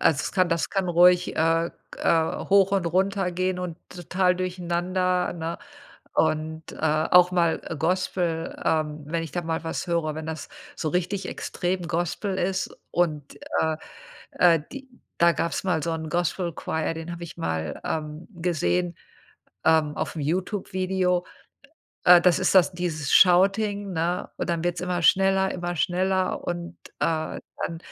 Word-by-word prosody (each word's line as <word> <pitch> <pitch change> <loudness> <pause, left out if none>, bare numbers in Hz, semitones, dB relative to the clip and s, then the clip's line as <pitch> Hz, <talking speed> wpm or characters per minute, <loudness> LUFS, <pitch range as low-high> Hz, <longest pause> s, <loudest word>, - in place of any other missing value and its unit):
also 145 -3 +3
es - - -4
kann 185 -2 +2
das 165 0 0
kann 195 -2 -1
ruhig, 180 +1 +4
äh, 165 +1 +2 0.3
äh, 160 -1 +1
hoch 195 0 +5
und 195 -3 +2
runter 190 +2 0
gehen 185 +1 -1
und 180 -2 -5
total 180 +1 0
durcheinander, 180 0 -1
ne? 165 0 -4 0.6
Und, 160 +1 -1
äh, - - -11
auch 160 +4 +4
mal 170 -2 +2 0.2
Gospel 170 0 -1
ähm, 155 -1 0
wenn 165 +2 -2
ich 155 - -8
da 175 - -1
mal 165 -1 -2
was 160 - -3
höre 160 -3 0
wenn 155 - -5
das 160 -3 -5 0.3
so 155 - -2
richtig 185 +3 -1
extrem 180 0 -3
Gospel 175 +3 -2
ist 190 +1 -1 0.2
und, 155 -5 -1 0.2
äh, 160 0 +1 0.6
äh, 170 -3 +5
die 270 -1 -8 0.3
da 170 0 +5
gab's 170 0 -2
mal 180 -5 0
so 165 - -2
'n 160 -1 -5
Gospel-Choir, 170 -1 -1
den 165 +1 -7
habe 170 0 -7
ich 170 - -9
mal, 80 - -3
ähm, 155 +1 -4
gesehen, 90 - 0 0.7
ähm, 155 -2 +3
auf'm 155 - -3
YouTube-Video. 185 +1 -1 0.8
Äh, 175 -1 +8
das 180 -1 +4
ist - - +2
das 185 - +5
dieses 165 -5 -3
Shouting, 200 +2 +4
ne, 175 +2 -1
und - - -3
dann 170 -1 -1
wird's 175 0 -1
immer 180 -1 -2
schneller, 190 +1 +4
immer 175 -1 -4
schneller 185 +2 0
und, 175 0 -4 0.2
äh, 160 -1 -1 0.3
dann 165 - -4
175 Hz, 155 wpm, -25 LUFS, 160-185 Hz, 0.8 s, Äh